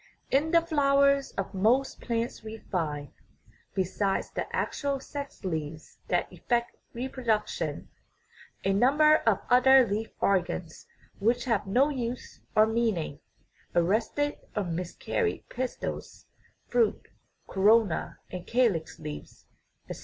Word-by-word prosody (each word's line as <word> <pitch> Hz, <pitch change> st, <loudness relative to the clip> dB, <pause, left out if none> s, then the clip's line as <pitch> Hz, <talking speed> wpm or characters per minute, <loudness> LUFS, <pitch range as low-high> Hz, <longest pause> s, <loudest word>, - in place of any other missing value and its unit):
In 285 Hz, +4 st, +3 dB
the 335 Hz, 0 st, +5 dB
flowers 280 Hz, -3 st, +3 dB
of 195 Hz, 0 st, -4 dB
most 230 Hz, +8 st, +2 dB
plants 230 Hz, 0 st, -2 dB
we 220 Hz, 0 st, -7 dB
find, 150 Hz, -9 st, -3 dB, 0.7 s
besides 195 Hz, +1 st, 0 dB
the -, -, -3 dB
actual 280 Hz, -1 st, -1 dB
sex 280 Hz, -5 st, -7 dB
leaves 160 Hz, -2 st, -5 dB
that -, -, 0 dB
effect 240 Hz, -1 st, -1 dB, 0.2 s
reproduction, 240 Hz, -3 st, -2 dB, 0.8 s
a 195 Hz, -, +2 dB
number 295 Hz, +8 st, +5 dB
of 215 Hz, -4 st, +3 dB
other 260 Hz, +1 st, +7 dB
leaf 215 Hz, +3 st, -2 dB
organs 175 Hz, -3 st, -1 dB, 0.3 s
which 235 Hz, +4 st, +1 dB
have 230 Hz, -5 st, 0 dB
no 255 Hz, +9 st, +3 dB
use 250 Hz, -3 st, -5 dB
or 215 Hz, -, +7 dB
meaning 220 Hz, -10 st, -1 dB, 0.6 s
(arrested 220 Hz, +11 st, +1 dB, 0.2 s
or 210 Hz, -, 0 dB
"miscarried" 180 Hz, -, -2 dB
pistils, 255 Hz, 0 st, -5 dB, 0.4 s
fruit, 465 Hz, -2 st, +1 dB, 0.4 s
corona, 205 Hz, -2 st, +3 dB
and 180 Hz, -1 st, -7 dB
calix 230 Hz, -10 st, +1 dB
leaves, 150 Hz, -1 st, -9 dB, 0.4 s
etc.). -, -, -7 dB
225 Hz, 115 wpm, -28 LUFS, 190-265 Hz, 0.8 s, other